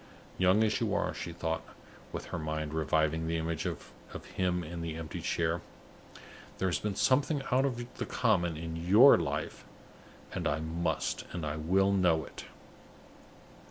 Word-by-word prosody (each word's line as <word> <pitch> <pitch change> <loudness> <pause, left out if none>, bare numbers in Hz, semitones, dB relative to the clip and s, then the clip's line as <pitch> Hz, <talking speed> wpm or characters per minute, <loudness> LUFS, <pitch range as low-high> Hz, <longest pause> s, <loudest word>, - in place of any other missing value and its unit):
"Young 95 +4 +5
as 110 - +1
you - - +1
are," - - 0
she 85 - -5
thought, 80 -1 -2 0.5
with - - -5
her 85 - -1
mind 80 -1 -3
reviving 80 +1 +1
the 85 0 0
image 80 -1 -2
of - - -6 0.4
him 90 -1 0
in 85 +1 -6
the 80 -1 -4
empty 80 -1 -6
chair, 80 0 0 1.0
"there 95 - 0
has 90 - 0
been 105 -2 -2
something 140 - +2
out 130 +2 +4
of 120 -2 -4
the - - -1
common 85 -9 +1
in 80 0 -5
your 100 +12 +7
life; 75 -2 -3 0.7
and - - -1
I 75 +1 0
must 80 +2 -2
and 80 -2 -4
will 95 +1 +4
know 90 -5 +3
it!" - - -10
85 Hz, 160 wpm, -31 LUFS, 80-95 Hz, 1.0 s, your